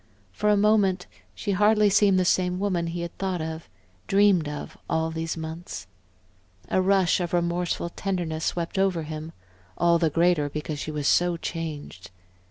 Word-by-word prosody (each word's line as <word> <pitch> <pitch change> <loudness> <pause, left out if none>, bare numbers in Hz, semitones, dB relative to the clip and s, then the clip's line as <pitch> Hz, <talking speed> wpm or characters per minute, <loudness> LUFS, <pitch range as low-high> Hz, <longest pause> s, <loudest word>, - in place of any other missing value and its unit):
For 210 - 0
a 210 - +4
moment 200 -3 +3 0.3
she 205 - -3
hardly 210 +2 +4
seemed 200 -1 +4
the 185 - +2
same 180 0 +2
woman 185 -4 0
he 170 +1 -4
had 170 -1 -6
thought 190 -2 -1
of, 160 0 -5 0.4
dreamed 195 -6 +4
of, 150 0 -7
all 160 0 0
these 165 0 -3
months. 160 - -6 0.8
A 185 - +2
rush 190 -2 +3
of 175 -1 -3
remorseful 170 0 0
tenderness 175 -4 -3
swept 170 +2 -2
over 190 -4 +1
him, 155 +1 -6 0.5
all 170 -1 +3
the 165 -2 +2
greater 165 -2 +2
because 150 0 -5
she - - -4
was 150 -2 -2
so 175 -1 +3
changed. 155 - -6
175 Hz, 165 wpm, -25 LUFS, 160-190 Hz, 0.8 s, a